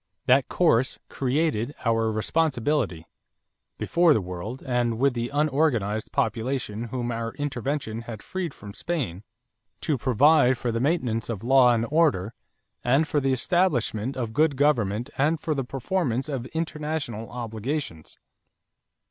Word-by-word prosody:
That 130 +1 +4
course 130 -8 +2
created 135 -2 0
our 115 -1 +2
responsibility, 120 - 0 0.7
before 170 -3 +3
the - - +3
world 90 +6 -6
and 120 -3 0
with 135 +2 +3
the 120 0 -2
unorganized 140 -8 +1
population 115 0 -1
whom 120 0 -3
our 115 0 -4
intervention 135 -4 -3
had 115 -2 -8
freed 185 -3 -3
from 100 -1 -11
Spain, 130 - -3 0.6
to 145 -5 0
provide 130 +1 +4
for 120 0 -2
the 115 - -1
maintenance 125 -6 0
of 110 -3 -4
law 130 0 +6
and 115 -1 +1
order, 140 - +2 0.5
and 135 +6 +3
for 145 - +1
the 135 0 +1
establishment 130 - +1
of 115 -3 -3
good 150 +1 +3
government 120 -4 +1
and 155 +3 +2
for 155 - -1
the 135 -2 -1
performance 135 0 -1
of 130 -4 -4
international 150 -8 -3
obligations. 115 - -4
125 Hz, 135 wpm, -25 LUFS, 115-150 Hz, 0.7 s, law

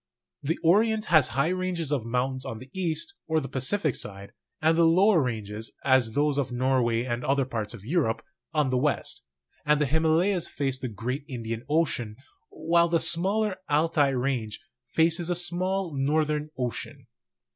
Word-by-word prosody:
The 160 +4 -1
Orient 215 +5 +3
has 155 -5 +6
high 140 +6 0
ranges 180 -4 -2
of 130 -6 -1
mountains 130 +2 -1
on 115 - -5
the 130 +3 -12
east, 190 - -2
or 160 0 +2
the 135 - -5
Pacific 135 - 0
side, 100 0 -7 0.3
and 160 +1 +3
the 170 - +4
lower 180 +2 +5
ranges, 110 -3 -4
as 130 -4 +3
those 145 +1 +1
of 130 -3 -2
Norway 125 -2 +1
and 120 -1 -3
other 135 0 +1
parts 115 -3 -4
of 105 -3 -13
Europe, 140 -5 0 0.3
on 150 -4 +1
the 130 - +2
west; 145 +2 -1 0.4
and 150 -1 +3
the 150 - +3
Himalayas 160 +5 +2
face 135 -2 -2
the 130 - -4
great 120 +7 -4
Indian 115 -2 -5
Ocean, 135 -9 0 0.3
while 170 +1 +2
the 170 0 +2
smaller 190 +5 +1
Altai 150 -1 +3
range 125 -4 -2 0.3
faces 165 +5 +1
the 175 - 0
small 180 0 -1
Northern 150 +2 0
Ocean. 130 +2 -5
145 Hz, 165 wpm, -27 LUFS, 125-165 Hz, 0.4 s, has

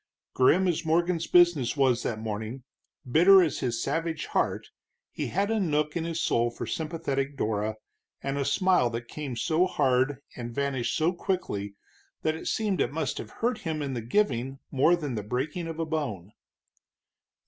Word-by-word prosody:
Grim 175 +9 +4
as 170 -2 0
Morgan's 170 +1 +1
business 170 -7 +4
was 130 -3 +3
that 115 - -2
morning, 110 +3 -5 0.4
bitter 180 +8 +7
as 160 - -1
his 120 -2 -1
savage 160 +2 -2
heart, - - -1 0.4
he - - -3
had 200 +4 0
a 225 - +1
nook 150 -5 0
in 165 -1 -1
his 165 0 -3
soul 120 -6 +2
for 120 - -6
sympathetic 145 -4 -2
Dora, 110 -1 -1 0.4
and 135 0 -3
a - - +1
smile 180 -4 +3
that 120 +1 -5
came 140 -1 -5
so 165 +8 +2
hard 135 -5 +2 0.2
and 120 -1 -6
vanished 140 -3 -1
so 165 +3 +2
quickly 105 - -3 0.5
that 155 - +2
it 160 - -7
seemed 210 -4 0
it - - 0
must 150 -3 -2
have - - -7
hurt 235 0 -1
him 155 -3 -3
in 135 -2 -3
the 120 - -3
giving 130 - 0
more 145 +6 +4
than 150 -6 -4
the 110 - -2
breaking 135 - -3
of 165 -1 -5
a 165 - -1
bone. 130 - -3
145 Hz, 175 wpm, -27 LUFS, 125-170 Hz, 0.5 s, bitter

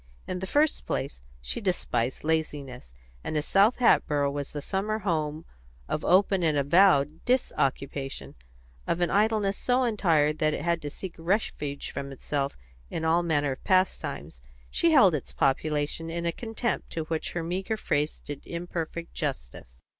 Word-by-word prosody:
In 180 - -3
the 190 - -4
first 295 +7 +1
place, - - -3 0.2
she 65 - -3
despised 175 - -1
laziness, 145 - -2 0.3
and 155 - -2
as 150 - -1
South 205 +5 +4
Hatboro' 145 - +3
was 140 -1 -4
the 150 - -4
summer 200 +7 -1
home 160 -5 -2 0.4
of 155 - -2
open 190 +1 +4
and 155 -3 +2
avowed 150 0 +4
disoccupation, 140 - -1 0.5
of 170 - 0
an 175 - +1
idleness 205 -1 +2
so 250 +1 +2
entire 170 -10 +3
that 155 0 +1
it - - -5
had 170 -1 +1
to 145 - -4
seek 180 +4 -7
refuge 165 -6 -1
from 140 0 -5
itself 140 +1 -3 0.3
in 160 - -3
all 165 +2 +4
manner 145 -4 +1
of 130 - -7
pastimes, 185 - 0 0.3
she 335 - +3
held 260 - +6
its 150 - -4
population 150 +3 0
in 170 +1 -3
a 170 - +2
contempt 230 +4 -3
to 165 - -2
which 160 0 -3
her 175 - -2
meagre 190 +6 -2
phrase 150 -6 -1
did 145 -1 -6
imperfect 170 -1 -5
justice. 65 - -5
165 Hz, 160 wpm, -27 LUFS, 145-190 Hz, 0.5 s, held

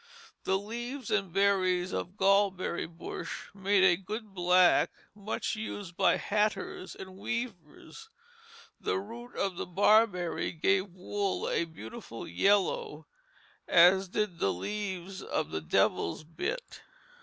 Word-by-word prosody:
The 190 - +2
leaves 240 +5 -6
and 200 -4 +1
berries 185 -1 +2
of 185 +3 -4
gall 195 +1 +5
berry 185 -3 -4
bush 165 +1 -7
made 195 0 +2
a 185 -2 +6
good 210 +1 -6
black 180 0 +4 0.2
much 210 +2 -3
used 205 -4 -6
by - - +4
hatters 285 - -1
and 190 0 -10
weavers. 235 - -6 0.7
The - - -1
root 230 +5 -8
of 195 -3 -1
the - - -4
barberry 195 -1 +3
gave 190 +4 +2
wool 195 +2 -3
a 170 - +1
beautiful 115 -6 -9
yellow, 190 -6 +1 0.6
as 190 +3 +6
did 200 -3 -2
the 95 - +2
leaves 190 - -4
of 155 - -2
the 80 - -2
devil's 85 - +1
bit. 170 - -5
195 Hz, 125 wpm, -30 LUFS, 175-210 Hz, 0.7 s, a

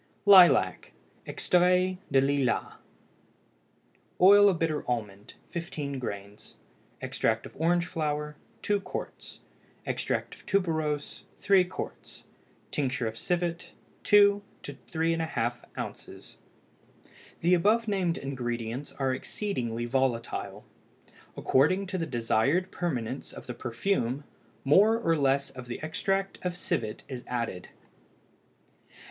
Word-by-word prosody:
LILAC 190 -3 +6 0.3
(EXTRAIT 180 +1 +2
DE 135 -1 +5
LILAS). 135 -2 0 1.5
Oil 205 +2 +8
of 185 - 0
bitter 160 -2 -1
almond 105 -4 -4 0.2
15 150 -5 -4
grains. 100 -3 -7 0.5
Extract - - -1
of - - -11
orange 170 +3 +2
flower 150 -2 -3 0.3
2 205 -1 +1
qts. - - -7 0.4
Extract - - -2
of - - -15
tuberose 160 -6 -1 0.2
3 185 -2 +4
qts. - - -8 0.5
Tincture 130 -4 -1
of 110 0 -3
civet 170 +4 -2 0.3
2 205 -1 +5 0.2
to 145 - -6
3½ 160 -6 -1 0.2
oz. - - -8 1.0
The 175 +2 +3
above 215 +6 +3
named 185 -5 0
ingredients 120 -1 -4
are 135 -1 0
exceedingly 125 - -3
volatile; 125 -2 -2 0.7
according 185 +9 +3
to 185 0 -3
the 165 - -2
desired 135 +8 +1
permanence 130 -7 -3
of - - -10
the 125 - -5
perfume, 125 +2 -1 0.4
more 205 +11 +5
or 165 -8 +1
less 140 -1 +1
of 130 -1 -10
the 120 - -5
extract 195 +5 -1
of 180 -1 -3
civet 110 -10 -2
is 130 -2 -7
added. 115 -7 -3
150 Hz, 110 wpm, -28 LUFS, 125-180 Hz, 1.5 s, Oil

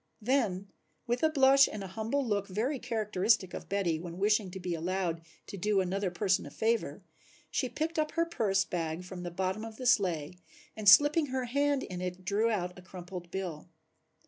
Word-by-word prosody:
Then 210 -6 0 0.3
with 240 0 -1
a 315 - +4
blush 275 -2 +6
and 210 -2 -5
an 190 - -7
humble 225 +7 -1
look 205 -3 -1
very 235 +8 -1
characteristic 215 -4 +1
of - - -7
Betty 185 -5 0
when 170 0 -7
wishing 210 0 +2
to 190 +1 -7
be 180 -1 -3
allowed 170 0 -2 0.2
to 200 - -8
do 205 +2 +1
another 190 +1 -1
person 185 +1 +1
a - - -8
favor, 220 -5 -1 0.5
she 255 - -1
picked 320 +4 -2
up 305 0 -1
her 335 0 +2
purse 205 -12 +1
bag 165 0 -3
from 180 0 -8
the 175 - -4
bottom 190 +4 -2
of 225 -1 -7
the 255 - -7
sleigh 180 -10 +2 0.4
and 215 -2 +4
slipping 290 +8 +6
her 260 -1 -2
hand 280 +2 +1
in 180 -1 -6
it 180 0 -5
drew 210 +4 +2
out 180 -4 -2
a - - -12
crumpled 180 -1 -9
bill. 180 -3 -5
200 Hz, 195 wpm, -30 LUFS, 180-240 Hz, 0.5 s, blush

